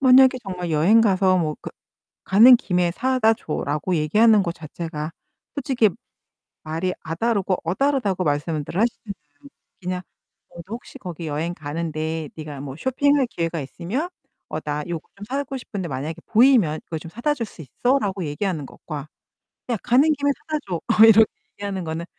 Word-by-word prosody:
만약에 260 0 +6
정말 180 -3 -5
여행 170 +9 +5
가서 190 -3 +3
뭐 155 -3 -1
그 - - -7 0.5
"가는 235 +6 +8
김에 180 -5 0
사다 250 -1 +2
줘."라고 150 0 -2
얘기하는 210 +7 +4
거 170 - -2
자체가 160 -1 -6 0.4
솔직히 255 -6 +2 0.7
말이 165 +4 -2
'아' 160 0 -4
다르고 200 -4 +1
'어' 170 +3 -1
다르다고 260 -9 +1
말씀들 150 +2 -2
하시잖아요. 200 - -3 0.3
그냥 180 0 -3 0.5
"너도 180 +6 -8
혹시 245 +3 -10
거기 175 - -7
여행 155 +3 -2
가는데 160 0 -4
네가 150 -3 -7
뭐 140 -1 -7
쇼핑할 275 - +2
기회가 165 -5 -2
있으면 185 - -4 0.4
어, - - -4
나 150 0 -3
요거 170 -2 -5
좀 205 - -9
사고 275 +1 -3
싶은데 200 -8 -5
만약에 150 +4 -4
보이면 225 - +4
이거 160 - -4
좀 160 +1 -10
사다 240 - 0
줄 235 -5 -4
수 180 - -12
있어?"라고 200 - 0
얘기하는 155 -1 -2
것과 150 -1 -8 0.6
그냥 235 -3 -1
"가는 265 +6 +4
김에 285 0 +1 0.2
사다 310 -1 -1
줘." 175 - -1
어 220 +6 +5
이렇게 220 0 +8 0.3
얘기하는 200 -2 -4
거는 160 +1 -4
185 Hz, 345 characters per minute, -23 LUFS, 160-235 Hz, 0.7 s, 가는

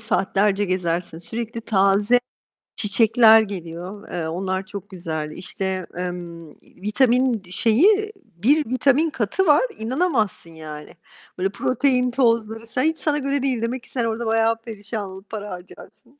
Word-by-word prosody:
saatlerce 205 -2 +1
gezersin. 175 -3 -2
Sürekli 230 +6 -5
taze 205 +2 +3 0.6
çiçekler 225 +2 +5
geliyor. 185 -1 -7
Eee, 165 -2 -3
onlar 190 +3 -2
çok 205 -1 -8
güzel. 160 -4 -4
İşte, 185 +2 -4
emm, 175 -2 -6
iii, - - -22
vitamin 245 +2 +2
şeyi, 395 - +3
bir 275 - +1
vitamin 275 +5 +3
katı 265 - -1
var, 295 +6 +6 0.2
inanamazsın 230 - -1
yani. 155 -2 -9 0.5
Böyle, 190 +1 0
protein 250 +4 +1
tozları, 230 -3 +1
sen 255 +3 -1
hiç 320 +1 +1
sana 300 -2 0
göre 275 0 -1
değil. 255 -4 0
Demek 240 +2 -3
ki - - -19
sen 245 - -2
orada 230 +1 -2
bayağı 225 0 +2
perişan 210 -2 -6
olup 190 +1 -12
para 210 -1 -6
harcarsın. 235 +9 -12
220 Hz, 140 wpm, -22 LUFS, 190-245 Hz, 0.6 s, var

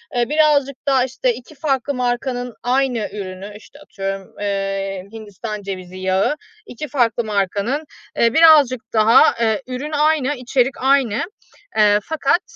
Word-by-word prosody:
ııı, 240 0 +1
birazcık 295 -3 +3
daha 265 -2 +3
işte 255 -1 -1
2 250 +6 -12
farklı 275 -1 -1
markanın 245 -1 -2
aynı 250 -3 0
ürünü, 195 0 -7
işte 285 +6 -17
atıyorum, 195 -8 -5 0.2
ııı, 195 -1 -3
Hindistan 215 -1 -7
cevizi 185 -2 -7
yağı, 190 +7 +1 0.3
2 300 +5 -7
farklı 240 -3 +1
markanın, 210 +7 -1 0.4
ııı, 230 +1 +3
birazcık 300 -7 +6
daha, 220 +1 +6
ııı, 225 +3 +2
ürün 260 +4 -5
aynı, 300 -2 +1
içerik 250 0 0
aynı, 265 -5 +2 0.5
eee, 210 -1 +5
fakat, 320 - +1
245 Hz, 135 wpm, -19 LUFS, 205-275 Hz, 0.5 s, birazcık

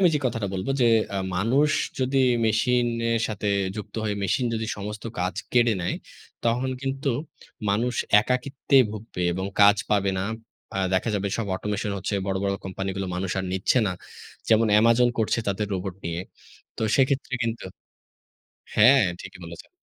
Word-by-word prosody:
আমি 185 - +6
যে 150 - +2
কথাটা 115 -4 -2
বলব 95 +4 -3
যে 120 - +5 0.3
আ - - -1 0.2
মানুষ 130 +10 +3 0.3
যদি 130 +1 0 0.3
মেশিনের 115 0 +1
সাথে 105 -1 -4 0.3
যুক্ত 105 - -7
হয়ে 105 -1 0
মেশিন 110 +6 +1
যদি 110 0 -2
সমস্ত 105 +1 -6
কাজ 90 0 -1 0.2
কেড়ে 120 -1 +4
নেয়, 85 - -1 0.5
তখন 120 +3 +1
কিন্তু 135 +1 -2 0.6
মানুষ 115 +5 +1 0.3
একাকিত্বেই 130 +3 +2
ভুগবে 105 -3 -6
এবং 95 +2 -3
কাজ 100 +1 +7
পাবে 100 -2 +2
না। - - -1 0.5
আ - - 0 0.2
দেখা 95 - +1
যাবে 100 0 -1
সব 115 - -1
অটোমেশন 105 +1 -3
হচ্ছে। 100 +2 -3
বড়, 95 -1 -1
বড় 100 0 +1
কোম্পানিগুলো 95 0 -3
মানুষ 90 +1 -2
আর 95 - -2
নিচ্ছে 95 +7 +2
না। 95 - 0 0.6
যেমন 110 0 +5
Amazon 115 +2 +5
করছে 110 +1 +1
তাদের 100 +2 -1
রোবট 95 0 -4
নিয়ে। 85 +1 -2 0.6
তো - - -4
সেক্ষেত্রে 135 -1 +1
কিন্তু 115 0 -3 1.1
হ্যাঁ, 125 +6 +7 0.2
ঠিকই - - -10
বলেছেন। 85 0 -10
110 Hz, 155 wpm, -25 LUFS, 95-125 Hz, 1.1 s, কাজ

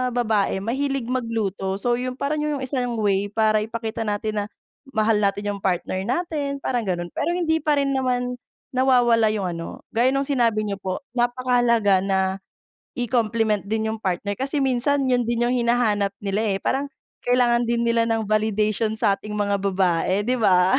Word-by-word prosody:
babae 220 -5 +1
mahilig 265 +4 -2
magluto. 225 -6 -2
So, 240 +2 +1
yun, 250 +1 -3
parang 295 +2 -1
'yun 300 -1 -1
yung 260 - -3
isang 250 -3 -1
way 200 -1 +1
para 215 0 +2
ipakita 225 0 -4
natin 210 0 -1
na - - -5 0.5
mahal 220 -2 +2
natin 205 0 0
yung 200 - -10
partner 185 0 -1
natin, 280 - -2
parang 255 -3 -1
ganun. 175 -5 -2
Pero - - -1
hindi 320 -2 +1
pa 300 -1 +2
rin 275 -1 +1
naman 250 -2 0 0.4
nawawala 245 -3 +4
yung 200 -3 -2
ano, 165 0 -7
gaya 240 +3 +3
nung 275 - +1
sinabi 235 -6 +1
niyo 200 -1 -3
po 190 +5 -4
napakahalaga 240 -4 +2
na 195 0 +1 0.8
i-compliment 230 -3 +1
din 220 +1 0
yung 220 - -6
partner. 195 0 -2
Kasi 270 +3 -2
minsan 270 +2 +1
'yun 245 -2 +2
din 235 0 0
yung 240 - +1
hinahanap 235 -5 +1
nila, 200 +1 -1 0.2
eh, - - -4
parang 275 +2 0 0.4
kailangan 240 -1 +3
din 235 0 0
nila 230 0 +2
ng 225 -1 +1
validation 215 +1 +1
sa 200 -2 +2
ating 210 0 -7
mga 200 -1 0
babae 190 0 +1
'di 250 +3 0
ba? 185 +3 +4
230 Hz, 175 wpm, -23 LUFS, 205-250 Hz, 0.8 s, nawawala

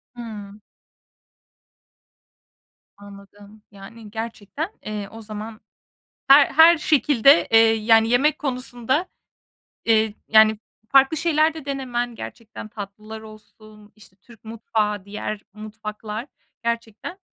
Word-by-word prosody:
Hıı. 210 -3 -9 2.4
Anladım. 205 +1 -15
Yani, 205 +2 -13
gerçekten, 230 - -5 0.2
eee, 210 -2 -5
o 225 - -10
zaman 215 +1 -8 0.7
her 275 +1 +8
her 325 +3 +6
şekilde, 290 -1 +4
eee, 225 - +7
yani, 225 0 +3
yemek 280 +5 +2
konusunda, 255 +2 -2 0.8
eee, 220 -2 +2
yani, 220 -1 +5 0.3
farklı 275 +3 +4
şeyler 315 -1 +2
de 315 - -9
denemen 250 -4 -3
gerçekten 225 -1 -9
tatlılar 215 +1 -9
olsun, 215 -1 -16
işte, 205 -3 -20
Türk 230 +3 -20
mutfağı, 215 -2 -2
diğer 210 0 -5
mutfaklar, 215 +1 -7 0.4
gerçekten, 235 - -4
220 Hz, 100 wpm, -22 LUFS, 210-250 Hz, 2.4 s, her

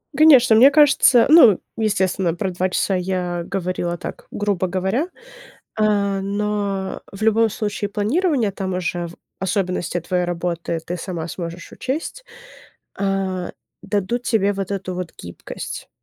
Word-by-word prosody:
Конечно, 265 -6 +7
мне 260 +5 +8
кажется 280 -5 +5
ну, 250 - +8 0.2
естественно, 190 -5 0
про 185 +2 -2
2 180 +1 -1
часа 190 +1 0
я 180 -1 -2
говорила 180 -2 -3
так, - - -8
грубо 200 -3 -1
говоря. 190 - -1 0.7
Э, 200 -2 +2
но 200 -1 -2
в 195 +2 -11
любом 220 0 +3
случае 205 -1 -3
планирование, 235 - +1
там 190 -1 -4
уже 175 -1 -2
в 170 - -12 0.2
особенности 185 -2 -1
от 170 - -6
твоей 180 -1 +1
работы 170 -1 -3
ты 175 +1 -4
сама 170 -2 -5
сможешь 170 0 -7
учесть, 315 - -4 0.8
а, 195 -2 -1 0.3
дадут 205 +4 -1
тебе 205 -4 +1
вот 195 -1 -4
эту 190 -2 -3
вот 180 -2 -5
гибкость. 85 0 -8
195 Hz, 140 wpm, -21 LUFS, 180-215 Hz, 0.8 s, мне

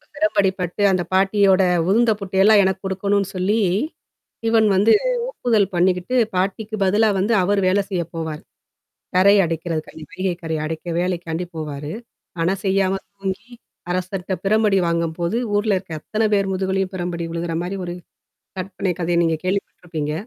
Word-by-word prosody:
பெரம்படிப்பட்டு 195 - 0
அந்த 185 -2 +1
பாட்டியோட 195 0 +4 0.3
உதுந்த 230 +3 +4
புட்டையெல்லாம் 200 +2 +4
எனக்கு 190 0 0
குடுக்கணும்னு 195 +1 0
சொல்லி, 195 +5 +1 0.9
இவன் 225 -1 +4
வந்து 205 +4 +5 0.4
ஒப்புதல் 215 - +1
பண்ணீக்கிட்டு, 180 +6 +1 0.2
பாட்டிக்கு 200 +4 -1
பதிலா 210 +4 +3
வந்து 200 +5 +1
அவரு 200 +2 +2
வேலை 200 +2 +3
செய்ய 180 -3 0
போவாரு. 160 -2 -4 0.7
கரை 200 +2 +6
அடைக்கிறதுக்காய் 160 -1 -4
வைகை 185 -1 -2
கரைய 160 -1 -2
அடைக்க 160 +1 -5
வேலைக்காண்டி 175 -1 -2
போவாரு. 150 -1 -5 0.5
அனா 170 +3 +2
செய்யாம 190 0 +2 0.2
தூங்கி 195 +4 -5 0.4
அரசர்ட்ட 185 +1 -3
பிரம்படி 210 -1 +3
வாங்கும்போது, 170 +4 -1 0.2
ஊர்ல 205 0 +2
இருக்க 185 -2 -9
அத்தன 215 +7 -2
பேர் 195 -1 +1
முதுகுலியும் 190 0 -1
பெரம்படி 175 -1 -3
உழுகுற 170 0 -3
மாரி 195 +2 -4
ஒரு 175 - -4 0.7
கற்பனை 185 0 -2
கதைய 170 0 0
நீங்க 165 -1 +1
கேள்விப்பட்டுருப்பீங்க. 175 -5 -3
190 Hz, 135 wpm, -21 LUFS, 175-200 Hz, 0.9 s, கரை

